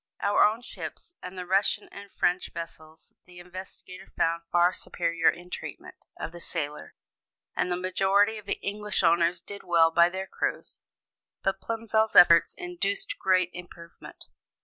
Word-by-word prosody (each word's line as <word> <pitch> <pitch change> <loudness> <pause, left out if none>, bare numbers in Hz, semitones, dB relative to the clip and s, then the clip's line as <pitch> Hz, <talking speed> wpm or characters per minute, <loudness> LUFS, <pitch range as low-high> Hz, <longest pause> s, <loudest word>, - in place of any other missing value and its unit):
Our 205 - +3
own 220 +3 +2
ships 350 - -9
and 180 +1 -8
the 180 - -5
Russian 195 +3 +1
and 200 0 -11
French 180 +1 0
vessels 160 -1 -10
the 180 0 -15
investigator 185 +1 -11
found 165 +1 +1
far 175 +1 +4
superior 170 -2 0
in 180 +1 -6
treatment - - -7 0.3
of - - -4
the 175 - -10
sailor: 150 - -4 0.6
and 180 - 0
the 175 - 0
majority 195 +4 +2
of 200 -1 -14
English 210 0 -2
owners 170 +1 +3
did 200 0 -9
well 170 -2 +4
by 170 +1 +5
their 190 +1 -4
crews; - - -4 0.6
but 195 0 -1
Plimsoll's 225 -1 0
efforts 170 -1 +7
induced 390 +3 -3
great 185 - +2
improvement. 175 -1 -12
180 Hz, 150 wpm, -27 LUFS, 170-200 Hz, 0.6 s, efforts